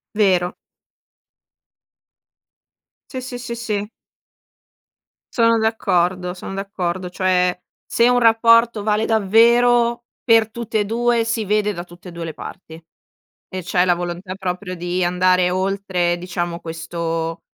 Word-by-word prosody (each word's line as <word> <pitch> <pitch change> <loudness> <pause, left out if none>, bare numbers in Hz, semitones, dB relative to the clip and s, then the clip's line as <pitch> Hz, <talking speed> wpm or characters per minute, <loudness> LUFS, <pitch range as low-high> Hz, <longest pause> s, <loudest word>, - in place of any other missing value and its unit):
Vero. 185 -4 +2 2.6
Sì, 260 -2 -5
sì, 250 -1 -6
sì, 235 -1 -6
sì. 210 -3 -3 1.5
Sono 230 -1 +4
d'accordo 180 -5 0
son 185 - -8
d'accordo 185 -2 -3
cioè, 180 -1 +1 0.3
se 235 +1 +3
un 245 0 +4
rapporto 230 -1 +4
vale 215 +1 +1
davvero 235 +3 +3 0.2
per 225 -2 +4
tutte 230 -1 -3
e - - -1
2 235 +1 +1
si 230 -1 -1
vede 210 0 0
da 175 - -6
tutte 175 +1 -13
e - - -10
2 170 0 -7
le 160 - -7
parti. 160 -4 -10 0.7
E 185 0 -5
c'è 180 +1 +1
la 180 - +3
volontà 175 +2 -5
proprio 185 0 -4
di 175 +1 -2
andare 180 0 +2
oltre 185 -2 -1
diciamo 175 -1 -4
questo 165 0 -4
190 Hz, 125 wpm, -20 LUFS, 180-225 Hz, 2.6 s, Sono